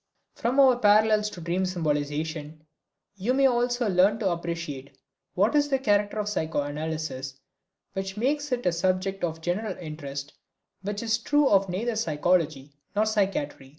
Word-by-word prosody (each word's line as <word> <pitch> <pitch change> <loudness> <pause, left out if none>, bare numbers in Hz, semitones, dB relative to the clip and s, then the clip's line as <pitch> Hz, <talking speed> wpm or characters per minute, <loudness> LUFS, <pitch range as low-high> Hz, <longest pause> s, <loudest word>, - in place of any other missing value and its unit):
From 250 +4 0
our 260 -3 +6
parallels 210 0 +4
to 175 - -10
dream 175 +3 -1
symbolization 155 -2 -2 0.5
you 225 +7 0
may 275 0 +4
also 245 -1 +2
learn 195 +2 +4
to 200 -5 0
appreciate 165 -5 -5 0.4
what 205 +5 +3
is 290 -1 +3
the 270 - +2
character 205 -4 +1
of 210 -1 -1
psychoanalysis 155 -5 -3 0.5
which 195 +1 -4
makes 290 +5 0
it 245 -1 -1
a 180 - +4
subject 185 +2 -1
of 165 -1 -2
general 185 +4 -2
interest, 145 -4 -7 0.5
which 205 +3 -4
is 220 -1 +1
true 290 +4 +3
of 195 -3 +3
neither 220 +6 -2
psychology 155 -6 0 0.2
nor 210 +1 +3
psychiatry. 195 -11 -1
190 Hz, 150 wpm, -26 LUFS, 160-220 Hz, 0.5 s, our